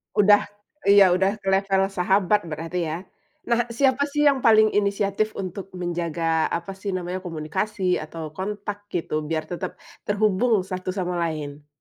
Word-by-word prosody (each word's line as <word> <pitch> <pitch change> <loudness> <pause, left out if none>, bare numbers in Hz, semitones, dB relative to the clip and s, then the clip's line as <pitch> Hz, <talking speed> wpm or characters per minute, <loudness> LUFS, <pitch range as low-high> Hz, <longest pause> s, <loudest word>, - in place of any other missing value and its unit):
Udah, 205 -1 +5 0.4
iya, 200 -2 +7
udah 195 +3 +1
ke 195 - -10
level 195 0 +2
sahabat 195 0 +2
berarti, 165 +2 -3
ya. 165 +4 -4 0.5
Nah, 235 0 +2
siapa, 265 +4 +2
sih, 295 +1 0
yang 280 -2 +4
paling 220 -3 +5
inisiatif 200 +1 0
untuk 190 +1 -5
menjaga, 170 -2 -1
apa, 170 +3 -4
sih, 195 +1 -6
namanya, 180 0 -3
komunikasi 180 +3 -2
atau 155 0 -7
kontak 205 +3 -5
gitu 160 -3 -1
biar 160 -1 -1
tetap 175 - -4 0.3
terhubung 210 +1 +2
satu 185 0 -5
sama 180 -2 -2
lain? 150 -3 -4
190 Hz, 145 wpm, -24 LUFS, 170-210 Hz, 0.5 s, iya